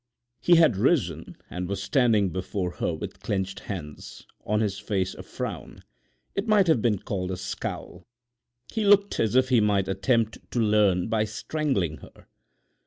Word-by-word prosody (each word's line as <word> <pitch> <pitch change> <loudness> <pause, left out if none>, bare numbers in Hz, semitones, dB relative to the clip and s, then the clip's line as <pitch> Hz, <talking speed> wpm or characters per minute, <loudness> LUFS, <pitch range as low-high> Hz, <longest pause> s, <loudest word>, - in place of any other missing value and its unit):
He 175 +8 +5
had 160 - +5
risen 100 - 0
and 90 0 -5
was 100 - -3
standing 115 -8 +3
before 95 +1 -3
her - - 0
with - - -6
clenched 100 0 -3
hands, 75 -7 -8 0.2
on 105 +1 0
his 100 -3 -1
face 100 -3 -1
a - - -9
frown—it 200 +3 -8
might 210 -3 +5
have 160 -9 +3
been 110 -3 +2
called 95 -1 -4
a 95 - -3
scowl. 90 0 -6 0.7
He 220 - 0
looked 200 0 +4
as 110 +1 +1
if 130 0 +4
he 125 -4 +4
might 100 -2 +2
attempt 110 +4 0
to 120 - 0
learn 105 -4 +3
by 110 -1 +1
strangling 110 - -2
her. - - -16
105 Hz, 160 wpm, -26 LUFS, 95-125 Hz, 0.7 s, He